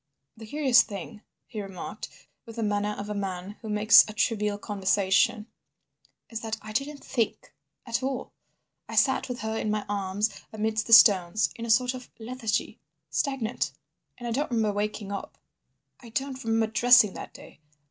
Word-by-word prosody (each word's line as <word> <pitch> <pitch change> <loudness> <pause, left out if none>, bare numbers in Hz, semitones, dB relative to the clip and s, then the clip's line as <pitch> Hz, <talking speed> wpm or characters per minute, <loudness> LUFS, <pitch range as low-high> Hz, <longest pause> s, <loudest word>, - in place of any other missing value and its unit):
"The 220 -1 -11
curious 265 -1 +4
thing," 205 +1 -7 0.2
he 215 -3 -6
remarked, 195 -2 -7 0.4
with 230 - -10
the 230 - -2
manner 205 0 -1
of 205 - -6
a 210 - -3
man 195 0 -5
who 220 - -7
makes 210 +1 +7
a - - -7
trivial 210 -2 0
conversation, 205 +3 +1 0.9
"is 225 - -4
that 220 -1 -4
I 215 - -10
didn't 275 +5 -3
think—at 235 0 -4
all. 260 -1 -3 0.6
I - - -5
sat 265 -1 +2
with 245 -3 -5
her 220 +1 -3
in 215 - -2
my 210 0 -1
arms 205 +1 -1 0.2
amidst 220 0 -1
the 230 - +3
stones—in 215 +1 +5
a - - -7
sort 250 +3 +3
of 255 -1 -9
lethargy—stagnant. 240 +1 -3 0.4
"And 240 -1 -7
I - - -2
don't 280 +6 -1
remember 220 -4 +1
waking 205 0 -3
up. 200 - -6 0.6
I 240 - -13
don't 265 +2 -4
remember 225 0 +1
dressing 240 -3 +6
that - - -8
day. - - -14
220 Hz, 160 wpm, -27 LUFS, 205-240 Hz, 0.9 s, makes